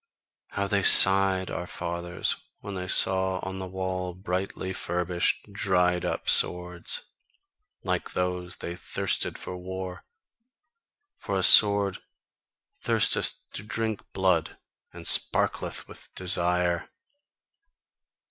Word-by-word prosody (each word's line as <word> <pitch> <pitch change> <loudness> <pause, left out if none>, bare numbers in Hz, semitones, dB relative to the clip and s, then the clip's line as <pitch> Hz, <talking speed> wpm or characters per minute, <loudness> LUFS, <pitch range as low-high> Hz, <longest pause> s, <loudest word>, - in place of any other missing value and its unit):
How 100 - -3
they 100 0 0
sighed, 95 -1 +6
our 90 +1 -6
fathers, 85 0 -4 0.3
when 100 - -8
they 90 -1 -6
saw 95 0 +2
on 95 0 -6
the 95 - -6
wall 90 -1 -5
brightly 95 0 -5
furbished, 90 +3 -2
dried 90 -2 0
up - - -4
swords! 90 0 +2 0.8
Like - - -3
those 90 0 -3
they 85 - -7
thirsted - - -3
for 90 - -8
war. 95 0 -8 1.2
For 100 -2 -4
a 95 - -1
sword 100 -1 +7 0.8
thirsteth - - +2 0.2
to - - -7
drink 110 0 -4
blood, 95 -4 -1 0.3
and - - -12
sparkleth - - +3
with - - -14
desire." 90 -1 -1
95 Hz, 110 wpm, -25 LUFS, 90-95 Hz, 1.2 s, sword